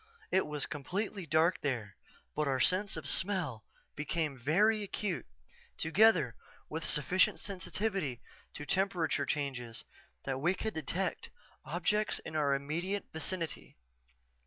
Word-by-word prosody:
It 190 Hz, -, +3 dB
was 150 Hz, -1 st, -2 dB
completely 185 Hz, +5 st, -3 dB
dark 160 Hz, +3 st, +3 dB
there 115 Hz, -9 st, -2 dB, 0.4 s
but 150 Hz, -1 st, +1 dB
our 135 Hz, -1 st, +1 dB
sense 190 Hz, +8 st, +2 dB
of -, -, -6 dB
smell 180 Hz, -, +1 dB, 0.3 s
became 150 Hz, 0 st, -1 dB
very 200 Hz, -, +3 dB
acute, 200 Hz, -2 st, -2 dB, 0.5 s
together 165 Hz, -, +4 dB, 0.3 s
with 160 Hz, +1 st, -3 dB
sufficient 180 Hz, +5 st, +3 dB
sensitivity 190 Hz, -, -2 dB, 0.4 s
to 145 Hz, -, -6 dB
temperature 175 Hz, -5 st, +1 dB
changes 130 Hz, -6 st, -2 dB, 0.4 s
that 135 Hz, -1 st, -2 dB
we 175 Hz, +5 st, +3 dB
could 220 Hz, +3 st, -2 dB
detect 165 Hz, +5 st, -2 dB, 0.4 s
objects 210 Hz, 0 st, +1 dB
in 160 Hz, -, -6 dB
our 145 Hz, -2 st, +3 dB
immediate 170 Hz, +8 st, -2 dB
vicinity. 165 Hz, -, -3 dB
160 Hz, 120 wpm, -33 LUFS, 140-190 Hz, 0.5 s, together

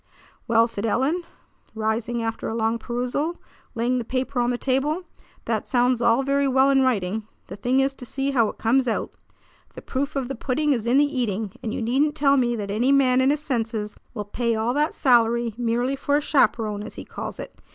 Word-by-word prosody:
"Well," 230 Hz, 0 st, +4 dB
said 210 Hz, -3 st, -6 dB
Ellen, 265 Hz, +10 st, +1 dB, 0.5 s
rising 225 Hz, +2 st, -1 dB
after 225 Hz, 0 st, -3 dB
a 220 Hz, -, -3 dB
long 225 Hz, 0 st, 0 dB
perusal, 250 Hz, +8 st, -2 dB, 0.4 s
laying 245 Hz, +2 st, +1 dB
the -, -, -3 dB
paper 255 Hz, +2 st, -2 dB
on 240 Hz, 0 st, +2 dB
the 245 Hz, -, 0 dB
table, 280 Hz, +7 st, 0 dB, 0.4 s
"that -, -, -2 dB
sounds 245 Hz, -1 st, +2 dB
all 235 Hz, +3 st, +3 dB
very 280 Hz, +1 st, +1 dB
well 265 Hz, +1 st, +4 dB
in 270 Hz, -1 st, +4 dB
writing. 215 Hz, -4 st, 0 dB, 0.2 s
The -, -, -8 dB
thing 250 Hz, +6 st, +1 dB
is 270 Hz, +1 st, +1 dB
to 260 Hz, -, -10 dB
see 275 Hz, +2 st, -1 dB
how 230 Hz, -5 st, +3 dB
it -, -, -9 dB
comes 250 Hz, +3 st, +2 dB
out. 225 Hz, -, -1 dB, 0.6 s
The -, -, -9 dB
proof 280 Hz, +3 st, -3 dB
of 270 Hz, -3 st, -1 dB
the 270 Hz, -, -4 dB
pudding 280 Hz, +4 st, 0 dB
is 235 Hz, -3 st, -3 dB
in 245 Hz, +3 st, +4 dB
the 290 Hz, -, +5 dB
eating, 225 Hz, -8 st, -2 dB
and 220 Hz, -, -3 dB
you 230 Hz, -, -3 dB
needn't 280 Hz, +6 st, +1 dB
tell 280 Hz, -2 st, +3 dB
me 240 Hz, -3 st, +2 dB
that 205 Hz, -3 st, -4 dB
any 240 Hz, +6 st, +2 dB
man 260 Hz, -2 st, +4 dB
in 260 Hz, -, +4 dB
his 295 Hz, +1 st, +1 dB
senses 225 Hz, -6 st, -2 dB, 0.2 s
will 210 Hz, -2 st, -4 dB
pay 230 Hz, +3 st, -1 dB
all 225 Hz, +3 st, 0 dB
that 300 Hz, +3 st, 0 dB
salary 235 Hz, -2 st, +3 dB
merely 240 Hz, +3 st, 0 dB
for 285 Hz, +1 st, 0 dB
a -, -, +4 dB
'chaperon,' 220 Hz, -8 st, +1 dB
as 215 Hz, -, -8 dB
he -, -, -8 dB
calls -, -, -6 dB
it. -, -, -8 dB
245 Hz, 215 wpm, -24 LUFS, 225-270 Hz, 0.6 s, the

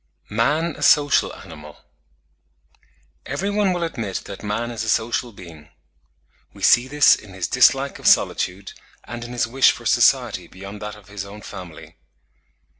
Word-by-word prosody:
MAN 150 Hz, +10 st, 0 dB
A -, -, -11 dB
SOCIAL 145 Hz, -1 st, +4 dB
ANIMAL. 75 Hz, -2 st, -12 dB, 1.5 s
Every 200 Hz, +3 st, -2 dB
one 205 Hz, -2 st, +1 dB
will 175 Hz, -1 st, -2 dB
admit 115 Hz, -, -4 dB
that 100 Hz, -, -9 dB
man 115 Hz, +3 st, -3 dB
is 115 Hz, -2 st, -4 dB
a 110 Hz, -, -3 dB
social 120 Hz, +2 st, 0 dB
being. 85 Hz, -6 st, -13 dB, 0.9 s
We -, -, -11 dB
see 120 Hz, +1 st, +5 dB
this 145 Hz, +1 st, +5 dB
in 95 Hz, -3 st, -13 dB
his 95 Hz, -, -3 dB
dislike 135 Hz, +2 st, +3 dB
of -, -, -2 dB
solitude, 95 Hz, +2 st, +2 dB, 0.3 s
and 120 Hz, +1 st, -8 dB
in 120 Hz, -, -8 dB
his 120 Hz, -1 st, 0 dB
wish 130 Hz, +3 st, +4 dB
for -, -, -4 dB
society -, -, +2 dB
beyond 100 Hz, +2 st, -10 dB
that 105 Hz, 0 st, -6 dB
of 105 Hz, -1 st, -18 dB
his 100 Hz, -1 st, -6 dB
own 100 Hz, +2 st, -11 dB
family. 90 Hz, -5 st, -11 dB
110 Hz, 160 wpm, -21 LUFS, 100-135 Hz, 1.5 s, see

